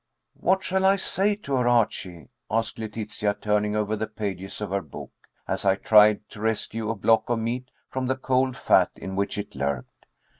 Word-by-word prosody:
"What 190 +2 +2
shall 190 +1 0
I 195 +1 +5
say 200 +2 +1
to 170 -9 -6
her, 125 -1 +1
Archie?" 95 - 0 0.2
asked 115 +1 -1
Letitia, 105 -1 -3
turning 105 0 0
over 105 0 0
the 110 +1 -3
pages 100 -3 -5
of 105 -2 -4
her 100 0 0
book, - - -10 0.4
as - - -2
I 95 -1 +4
tried 105 +1 +5
to 105 - -10
rescue 110 0 -1
a 115 - -1
block 110 +3 +2
of 120 - +2
meat 120 +3 -3 0.2
from 130 -1 -3
the 130 - +1
cold 130 0 0
fat - - +4
in 95 0 -6
which 100 +1 -1
it 105 - -5
lurked. 70 -3 -4
110 Hz, 190 wpm, -25 LUFS, 105-125 Hz, 0.4 s, I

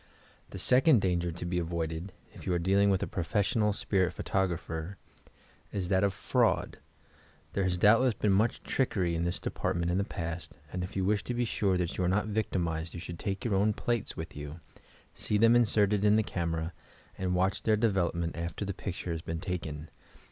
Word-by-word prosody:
The - - -8
second 130 - +5
danger 90 -3 0
to 85 +2 -6
be 90 0 0
avoided 85 +1 -3 0.2
(if - - -11
you 90 - +1
are - - +2
deal 95 +3 +2
ing 100 0 +5
with 95 -1 +2
a - - -2
professional 105 +4 +1
spirit 95 -3 0
photographer) 90 0 -2 0.7
is 95 -3 -2
that 95 0 +3
of 100 - +3
fraud. - - +1 0.7
There 100 - +1
has 90 -1 +1
doubtless 115 +5 +5
been 105 0 +1
much 105 +5 +2
trickery 95 -10 0
in 85 +1 0
this 85 +1 -1
department 85 -2 -1
in 90 - +1
the - - +2
past, 85 -2 -5 0.2
and 90 0 -2
if 90 - -7
you 95 -1 0
wish 105 +1 +1
to 125 - -2
be 120 0 +1
sure 100 -4 +1
that 90 0 -2
you - - +2
are 90 - +2
not 100 +3 +2
victimized 85 -7 -2
you - - -5
should 85 0 -7
take 100 0 -3
your 115 - +1
own 105 +2 +3
plates 120 +1 -2
with 80 0 -6
you, 75 +3 -7 0.5
see 105 - 0
them 115 +2 +6
inserted 105 -3 +3
in 105 0 +5
the 110 - +3
camera 85 -2 -2 0.4
and 90 -1 -1
watch 95 +2 +1
their 110 -1 +3
development 90 -6 0
after 85 +4 -4
the 100 - -3
picture 90 -1 -5
has 80 -1 -3
been 80 0 -4
taken. 80 -4 -4
95 Hz, 200 wpm, -30 LUFS, 85-105 Hz, 0.7 s, them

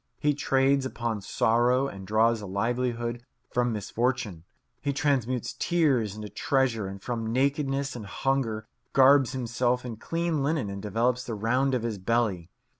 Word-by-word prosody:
He 150 -1 +2
trades 135 -1 +2
upon 120 -4 -3
sorrow 120 +6 +2
and 95 -6 -8
draws 110 +2 +3
a 100 - -6
livelihood 120 +3 -1 0.3
from 120 0 +1
misfortune. 110 -4 -2 0.4
He 140 - -1
transmutes 130 -4 0
tears 135 - +2
into 105 0 -6
treasure, 115 0 0
and 100 +1 -7
from 115 +1 -3
nakedness 140 +1 0
and 110 -4 -7
hunger 115 -2 -1 0.3
garbs 135 -1 +6
himself 125 0 0
in 115 -3 -5
clean 165 +3 -1
linen 140 -7 0
and 100 0 -6
develops 115 +5 0
the 115 - -4
round 125 +5 +1
of 120 - -1
his 110 -4 -3
belly. 100 -5 0
120 Hz, 150 wpm, -27 LUFS, 110-135 Hz, 0.4 s, garbs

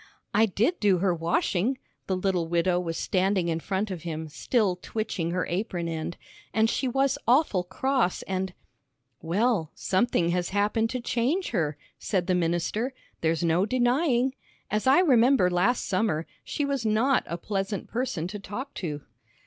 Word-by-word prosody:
"I 220 +2 +5
did 230 - +1
do 200 -3 +4
her 185 0 +2
washing," 175 +8 0 0.3
the 190 - 0
little 185 -3 0
widow 175 +1 +2
was 165 -2 -3
standing 185 -2 +1
in 165 0 0
front 195 +4 -2
of 180 -3 -5
him, 160 -1 -5
still 200 - +1
twitching 205 -4 -3
her 180 0 -1
apron 175 -2 -2
end, 165 +1 -4 0.4
"and 220 +1 +3
she 265 - -1
was 270 +2 +1
awful 240 - +3
cross, 235 +3 0
and 190 0 -2 0.4
" 120 -1 -49
"Well, 205 -5 +2
something 185 -3 +1
has 175 0 0
happened 210 +3 +1
to 255 0 -3
change 255 +11 0
her," 155 -8 0 0.2
said 185 -4 0
the 185 - +1
minister, 180 +9 0 0.3
"there's 165 0 +1
no 170 +4 +2
denying. 255 +2 +2 0.4
As 215 +4 0
I 275 +7 +6
remember 250 - +4
last 195 +8 +2
summer, 185 -5 0 0.2
she 290 - -2
was 280 -3 -1
not 225 +5 +2
a 170 - -3
pleasant 195 +1 -3
person 230 -9 -2
to 205 - -6
talk 245 +8 -6
to." 150 -5 -4
195 Hz, 165 wpm, -27 LUFS, 175-240 Hz, 0.4 s, I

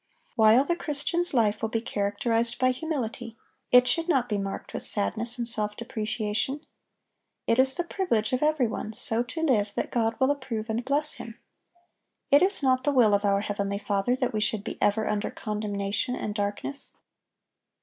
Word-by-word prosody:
(826) - - -37
While 225 +4 +6
the 345 +3 -2
Christian's 335 +4 0
life 215 -6 +1
will 225 - -1
be 225 - -1
characterized 225 +2 0
by 255 0 +3
humility, 255 -5 -4 0.3
it 250 0 +7
should 330 +4 0
not 265 -7 +2
be 210 -3 -1
marked 195 0 -5
with - - -3
sadness 225 +3 +1
and 235 -1 -2
self 210 -3 -1
depreciation. 220 +4 -2 0.8
It 230 +2 +2
is 265 0 +5
the 350 - -1
privilege 300 - -1
of 255 - +1
every 300 -3 +2
one 220 -1 -4
so 225 0 +1
to 250 +6 -5
live 215 -9 +1
that - - -2
God 225 -1 0
will 265 +1 +3
approve 240 -6 -4
and 230 +2 -2
bless 290 +3 0
him. 230 0 -9 0.9
It 285 - +7
is 375 -4 +2
not 255 -1 +3
the 290 - +2
will 240 -6 +4
of 200 +1 +2
our 200 -1 +2
heavenly 200 -1 -2
Father 205 +3 0
that 255 -2 -2
we 215 - 0
should 215 -1 0
be - - -7
ever 215 +1 +2
under 210 0 -1
condemnation 210 +2 -3
and 210 - -4
darkness. 205 +7 -3
230 Hz, 185 wpm, -27 LUFS, 210-265 Hz, 0.9 s, it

